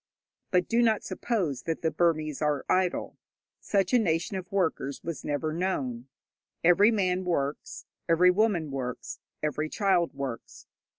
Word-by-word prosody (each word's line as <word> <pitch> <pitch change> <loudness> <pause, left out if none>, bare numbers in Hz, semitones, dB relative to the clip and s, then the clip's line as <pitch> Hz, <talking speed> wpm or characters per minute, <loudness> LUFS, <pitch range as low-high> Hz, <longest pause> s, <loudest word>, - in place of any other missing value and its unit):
But 180 -2 +2
do 235 +1 +2
not 225 -3 +2
suppose 185 - -2
that 165 0 -4
the 160 - +2
Burmese 155 -4 0
are 150 -2 0
idle. 185 -1 0 0.4
Such 200 +3 0
a 250 - +6
nation 175 -2 0
of 185 +1 -6
workers 165 -7 -1
was 170 -2 -5
never 150 +2 -2
known. 135 -9 -2 0.6
Every 175 +5 +6
man 185 -4 +1
works, 145 -5 -3 0.2
every 180 +2 +6
woman 180 -6 +1
works, 125 -2 -5 0.2
every 155 +1 -1
child 185 -4 +1
works. 135 -4 -6
170 Hz, 140 wpm, -28 LUFS, 150-190 Hz, 0.6 s, a